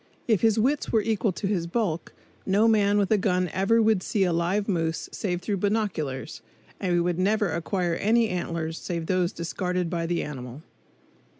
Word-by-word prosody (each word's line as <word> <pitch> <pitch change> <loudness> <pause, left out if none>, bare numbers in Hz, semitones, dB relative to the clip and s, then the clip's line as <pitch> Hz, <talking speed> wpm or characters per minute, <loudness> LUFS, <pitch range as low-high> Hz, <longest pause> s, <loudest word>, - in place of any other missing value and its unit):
If 220 -5 +3
his 225 -2 +3
wits 270 +7 +1
were 220 -2 +3
equal 220 -1 +1
to 170 - -5
his 190 -4 0
bulk, 175 -4 -2 0.3
no 205 +4 +3
man 205 -2 +3
with 200 0 +1
a 215 - +4
gun 180 -3 +1
ever 220 +4 +3
would 215 -3 +3
see 195 +2 0
a 180 -2 +1
live 180 +5 0
moose 165 -4 -1
save 180 -3 -2
through 205 0 -1
binoculars, 180 - -2 0.4
and 175 -2 +1
we 175 0 +1
never 200 +3 +1
would - - -2
acquire 175 0 -1
any 225 +6 +2
antlers 165 -2 -3
save 170 -2 -4
those 180 0 +1
discarded 180 +1 -2
by 170 -2 -1
the 175 0 -1
animal. 130 0 -7
185 Hz, 185 wpm, -26 LUFS, 170-210 Hz, 0.4 s, a